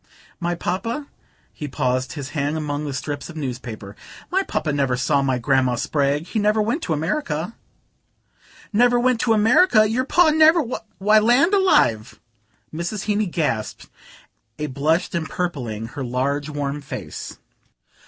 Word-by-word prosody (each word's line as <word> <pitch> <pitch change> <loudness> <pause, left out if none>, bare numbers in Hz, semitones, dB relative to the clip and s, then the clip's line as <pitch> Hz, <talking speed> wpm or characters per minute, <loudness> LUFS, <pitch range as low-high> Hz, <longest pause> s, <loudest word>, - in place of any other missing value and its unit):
"My 175 -1 -1
Papa?" 230 - -3 0.5
He 150 - -6
paused, 130 -1 -1
his 145 -3 -6
hand 145 +1 -2
among 150 -1 -3
the 145 - -3
strips 145 +3 -5
of 170 - -10
newspaper. 120 -7 -6 0.4
"My 380 +2 +2
Papa 155 - -2
never 135 -3 +1
saw 140 +2 +2
my 135 -2 +1
Grandma 130 0 +2
Spragg. 140 +4 0
He 220 - -2
never 210 +1 +2
went 230 +10 0
to 165 - -1
America." 160 - -2 1.2
"Never 240 +3 +4
went 250 -1 +2
to 225 -1 +2
America? 220 - +5
Your 245 +4 0
Pa 335 +3 +4
never? 315 +1 +5 0.3
Why, 210 +3 +5
land 245 - +4
alive!" 130 - +2 0.5
Mrs. 170 +5 -3
Heeny 210 0 0
gasped, 145 -11 -3 0.7
a 150 - -3
blush 150 +5 0
empurpling 140 -10 -3
her 140 +2 -6
large 140 +4 -1
warm 145 -1 -3
face. 100 - -7
155 Hz, 145 wpm, -22 LUFS, 140-215 Hz, 1.2 s, America